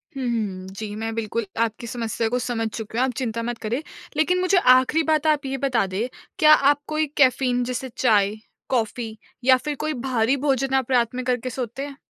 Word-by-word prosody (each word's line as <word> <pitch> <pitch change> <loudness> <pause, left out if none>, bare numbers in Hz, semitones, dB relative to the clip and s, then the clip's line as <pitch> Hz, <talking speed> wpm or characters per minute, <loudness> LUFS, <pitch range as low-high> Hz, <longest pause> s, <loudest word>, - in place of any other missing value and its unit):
हुँ, 270 - -4
हुँ। 195 -5 -3
जी, 205 +2 -7
मैं 225 +1 -3
बिल्कुल 230 0 -2 0.2
आपकी 230 +1 -4
समस्या 230 -1 -2
को 250 - 0
समझ 230 -2 -2
चुका, 220 +2 -4
आप 260 - +1
चिंता 230 -3 -2
मत 240 0 -3
करें। 230 +6 -3 0.4
लेकिन 360 +4 +2
मुझे 370 +1 +3
आख़िरी 260 +1 +5
बात 315 -1 +1
आप 300 -2 +2
ये 270 0 -2
बता 255 -6 +1
दें, 195 +6 -2 0.3
क्या 305 0 +8
आप 285 0 +4
कोई 310 0 0
कैफ़ीन 255 -2 +3
जैसे 250 +1 -4
चाय, 210 -4 +3 0.3
कॉफ़ी 225 -2 -2 0.3
या 260 0 +6
फिर 295 +3 -4
कोई 305 +2 -2
भारी 250 +1 +2
भोजन 270 0 +1
आप 265 -1 0
रात 240 -1 +2
में 255 - -3
करके 250 0 -1
सोते 250 +1 -4
हैं? 285 -1 -9
250 Hz, 200 wpm, -23 LUFS, 225-270 Hz, 0.4 s, क्या